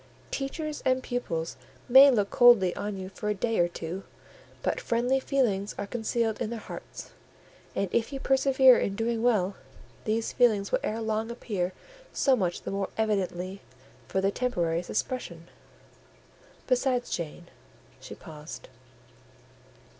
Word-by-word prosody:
Teachers 300 +2 -4
and 260 0 +1
pupils 170 -10 -3 0.3
may 265 +3 +9
look 205 -6 +1
coldly 240 -8 +6
on 205 -1 -4
you 185 0 -6
for 210 +2 -4
a 210 - 0
day 225 +3 0
or 175 - +4
two, 175 +2 -6 0.6
but - - -1
friendly 245 +3 +1
feelings 230 -8 0
are - - -3
concealed 225 +1 -1
in 225 - -1
their 235 - -4
hearts; - - -9 0.6
and 200 - 0
if 235 +2 0
you 275 - -4
persevere 265 -1 +5
in 195 - -1
doing 225 +1 -1
well, 205 -5 +2 0.5
these 225 +1 -1
feelings 215 -5 +3
will - - +2
ere 225 +2 -2
long 220 +1 -1
appear 200 -6 -3 0.4
so 270 -2 +3
much 180 -7 -2
the - - -4
more 195 -1 -2
evidently 195 -3 -1 0.5
for 190 - 0
their 195 +1 +2
temporary 175 -10 0
suppression. 175 -3 -4 1.2
Besides, 250 -1 +1
Jane"—she 170 +1 -9
paused. 160 - -10
220 Hz, 140 wpm, -28 LUFS, 190-245 Hz, 1.2 s, may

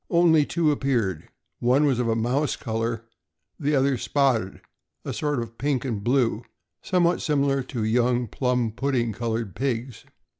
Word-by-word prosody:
Only 165 -4 +4
two 160 -3 +2
appeared; 120 - -1 0.3
one 130 +5 +3
was 135 -4 +2
of 125 - 0
a 115 - +1
mouse 125 +6 0
color, 115 -1 -3 0.5
the 150 -1 +1
other 135 -1 +2
spotted, 125 -10 +1 0.5
a - - -3
sort 145 -2 -1
of 115 0 -7
pink 140 -2 0
aud 110 -6 -3
blue, 120 -2 +1 0.4
somewhat 175 -1 +1
similar 140 -2 +1
to 120 -4 -4
young 120 +2 +2
plum 125 0 0
pudding 120 -1 -1
colored 115 -2 -3
pigs. 125 0 -3
125 Hz, 150 wpm, -25 LUFS, 115-140 Hz, 0.5 s, Only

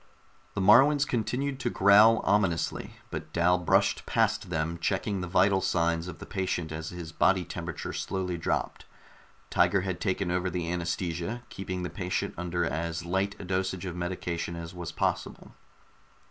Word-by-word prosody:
The - - 0
Moruans 135 +9 +6
continued 130 +3 -1
to 120 - -1
growl 105 +2 +6
ominously, 95 -5 0 0.2
but - - -6
Dal 90 +1 +3
brushed 90 - +2
past - - +1
them, 85 0 -2
checking 95 +2 -1
the 90 - -3
vital 95 +2 +3
signs 85 -1 +1
of 90 - -7
the - - -9
patient 90 -4 -2
as 80 +1 -5
his 85 -2 -7
body 95 +2 +2
temperature 85 +1 -5
slowly 95 -2 -2
dropped. 85 - -2 0.7
Tiger 95 - +3
had 95 -1 -4
taken 95 -2 0
over 90 +1 0
the 85 -1 -3
anaesthesia, 85 +6 -3
keeping 90 -2 -5
the 90 - -3
patient 90 +1 -2
under 85 0 -1
as 85 +1 -3
light 95 +3 0
a - - -8
dosage 95 0 -2
of 90 -2 -4
medication 85 -1 -3
as 85 0 -7
was 85 -2 -6
possible. - - -2
90 Hz, 160 wpm, -28 LUFS, 85-95 Hz, 0.7 s, Moruans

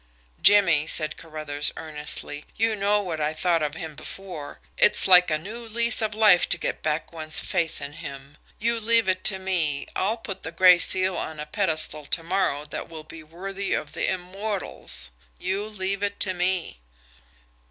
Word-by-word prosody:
"Jimmie," 170 -7 +5
said 155 -1 +4
Carruthers 155 -2 -3
earnestly. 150 -1 -6
"You 225 -1 0
know 205 +1 +1
what 165 -5 -5
I 150 +1 -1
thought 170 -1 +1
of 150 -1 -3
him 160 -1 -7
before. 165 -2 -9 0.2
It's - - +6
like 180 -1 +6
a 155 - +1
new 205 +9 -8
lease 235 +2 +3
of 215 -1 -2
life 210 -5 +4
to - - +1
get - - -4
back 155 +2 -3
one's 155 -1 +2
faith 170 -4 -2
in 140 +1 -7
him. 140 0 -10 0.2
You 230 +1 0
leave 230 -1 +2
it 185 0 -1
to 195 - +3
me. 175 -7 -1
I'll 215 +5 -1
put 195 -4 -7
the 160 - -6
Gray 180 +1 +6
Seal 185 0 +3
on 160 -1 -5
a 150 - -5
pedestal 155 -3 -2
to 165 - +1
morrow 165 -5 -1
that 150 - -7
will 160 -2 -9
be 160 +1 -12
worthy 195 +5 -5
of 145 - -5
the 170 - -1
immortals 190 - -1 0.3
you 190 +3 -3
leave 200 -2 -3
it 205 0 -3
to 185 - +3
me." 180 - -1
180 Hz, 180 wpm, -24 LUFS, 155-200 Hz, 0.3 s, It's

